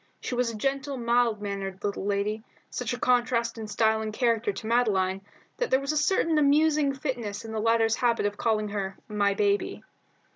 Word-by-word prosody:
She - - -5
was 245 -1 +1
a 230 - -6
gentle, 275 +3 -2
mild 235 -3 +1
mannered 195 -1 -5
little 200 -1 -2
lady, 205 +2 -1 0.3
such 250 -2 -3
a 245 - -2
contrast 240 -2 +1
in 220 - -5
style 220 +1 +2
and 215 0 -3
character 230 -1 +1
to 195 +2 -8
Madeline 195 -5 +1 0.4
that - - -1
there 260 - +4
was 275 +1 -2
a - - -2
certain 315 0 +2
amusing 300 0 +3
fitness 235 -6 -4
in 225 - -7
the 220 - -2
latter's 225 0 +2
habit 235 -4 +1
of 205 0 -1
calling 215 -1 0
her 195 -2 -4
"My 205 -2 +1
baby." 205 0 0
225 Hz, 190 wpm, -27 LUFS, 205-250 Hz, 0.4 s, there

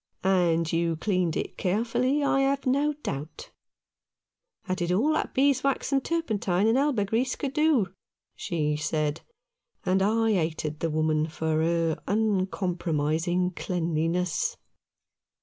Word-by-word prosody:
" - - -44
And 170 -4 +2
you 165 0 +1
cleaned 180 -1 0
it - - -5
carefully, 240 +8 +1
I 275 -1 +2
have 275 0 +1
no 280 +3 +2
doubt." 145 +3 -6 0.6
" 475 - -43
I 185 - 0
did 175 -2 -1
all 245 +13 +2
that - - -2
beeswax 275 0 +2
and 270 -1 +2
turpentine 215 - 0
and 225 +1 +3
elber 265 -6 +2
grease 235 +6 0
could 275 -2 -4
do," 295 - +2 0.4
she 150 -3 -1
said; 150 0 -1 0.6
and 190 +1 +2
I 220 +2 +2
hated 160 -4 -2
the 165 - -1
woman 155 0 +1
for 160 0 -1
her 165 -1 0
uncompromising 180 -4 0
cleanliness. 170 -1 -1
185 Hz, 130 wpm, -27 LUFS, 165-240 Hz, 0.6 s, and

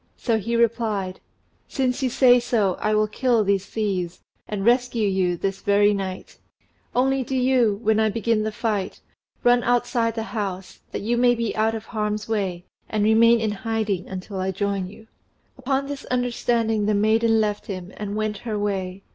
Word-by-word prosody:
So 230 -3 0
he 230 +3 -2
replied 225 -5 0 0.5
"Since 260 0 -1
you 260 - +1
say 250 0 +5
so, 220 -6 +1
I 215 0 +1
will 215 0 +3
kill 235 +1 +1
these 200 -1 0
thieves, 190 -6 -2 0.3
and 205 -2 -3
rescue 240 -2 +2
you 185 -2 +1
this 195 +2 -3
very 205 +1 +4
night; 190 -2 -5 0.6
only 265 +1 +2
do 265 +2 -4
you, 250 -5 +2
when 220 -1 +3
I 220 0 +3
begin 225 +1 0
the 215 0 -2
fight, 210 -3 -2 0.4
run 245 0 +5
outside 240 -1 +1
the 225 - -2
house, 195 -4 -4
that - - -4
you 235 +3 0
may 245 0 +4
be 230 -1 -2
out 220 +1 +1
of 220 - -6
harm's 210 -2 -3
way, 190 -5 -2 0.2
and 215 -1 0
remain 230 +2 +5
in 220 -1 0
hiding 210 -3 -2
until 190 +1 -6
I 185 +1 -1
join 195 0 -2
you." 215 +3 -13 0.5
Upon 270 +1 -1
this 280 0 -6
understanding 235 -3 0
the 210 - +2
maiden 225 +2 +3
left 210 -1 -1
him, 185 -1 -6
and 205 -1 -5
went 215 -1 -2
her 220 -3 -4
way. 195 -2 -3
215 Hz, 180 wpm, -23 LUFS, 200-235 Hz, 0.6 s, say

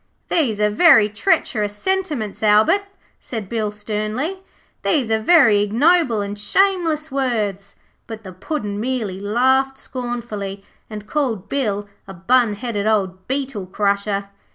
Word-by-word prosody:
'These 250 -11 +1
are 210 0 +2
very 230 -4 +6
treacherous 210 - 0
sentiments, 305 - -2
Albert,' 220 - +4 0.3
said 220 -5 -6
Bill 215 -1 -2
sternly. 215 - -3 0.4
'These 265 -9 0
are 220 - +2
very 230 -5 +5
ignoble 235 - +2
and 200 0 -5
shameless 325 - +1
words,' 215 -7 -2 0.3
but 225 -1 -8
the 185 -2 -9
Puddin' 205 - -4
merely 220 -6 -2
laughed 260 +6 +1
scornfully, 230 -7 -5 0.3
and 210 -1 -7
called 235 -8 -2
Bill 205 -7 -1 0.2
a 195 - -9
bun 230 +5 +2
headed 215 -2 -3
old 190 -4 0
beetle 260 -8 -3
crusher. 200 +1 -1
220 Hz, 130 wpm, -20 LUFS, 205-270 Hz, 0.4 s, very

